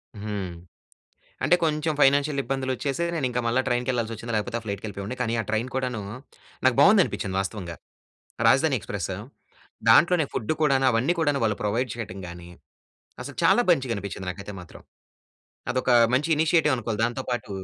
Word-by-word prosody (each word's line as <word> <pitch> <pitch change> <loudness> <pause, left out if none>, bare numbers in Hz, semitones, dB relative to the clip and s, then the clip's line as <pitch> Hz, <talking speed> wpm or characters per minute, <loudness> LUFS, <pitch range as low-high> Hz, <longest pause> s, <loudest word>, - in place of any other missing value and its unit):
హ్మ్. 100 -3 -5 0.9
అంటే 180 - +5
కొంచెం 155 0 0
ఫైనాన్షియల్ 140 +1 +3
ఇబ్బందులు 135 -1 -2
వచ్చేసే. 140 +6 -2
నేను 150 -5 -1
ఇంకా 125 0 -1
మళ్ళా 120 +3 +2
ట్రైన్‌కెళ్ళాల్సి 120 -2 0
వచ్చింది. 115 +1 -6
లేకపోతే 105 +2 -1
ఆ - - -14
ఫ్లైట్‌కెళ్ళిపోయావాడిని. 100 +2 -5
కానీ 115 -2 -1
ఆ - - -6
ట్రైన్ 110 +3 -1
కూడాను, 125 -4 -2 0.6
నాకు 130 -2 +4
బాగుంది 200 0 +7
అనిపించింది 95 -1 -4
వాస్తవంగా. 95 -4 -5 0.7
రాజధాని - - +4
ఎక్స్ప్రెస్. - - -4 0.8
దాంట్లోనే 170 0 +5
ఫుడ్ 115 +5 -1
కూడాను. 135 -3 +3
అవన్నీ 125 +10 +1
కూడాను 145 -4 +1
వాళ్ళు 105 -2 0
ప్రొవైడ్ 115 +5 0
చేయటం 105 -5 -6
గాని, 85 0 -10 0.7
అసలు - - -8
చాలా 245 - +5
మంచిగనిపించింది 100 - -2
నాకైతే 100 +2 -9
మాత్రం. 85 - -13 0.9
అదొక 130 0 0 0.2
మంచి 145 +5 +1
ఇనిషియేటివ్ 160 -2 +3
అనుకోవాలి. 115 -3 -3
దాంతో 120 +2 -2
పాటు 120 -4 -3
120 Hz, 150 wpm, -25 LUFS, 105-140 Hz, 0.9 s, బాగుంది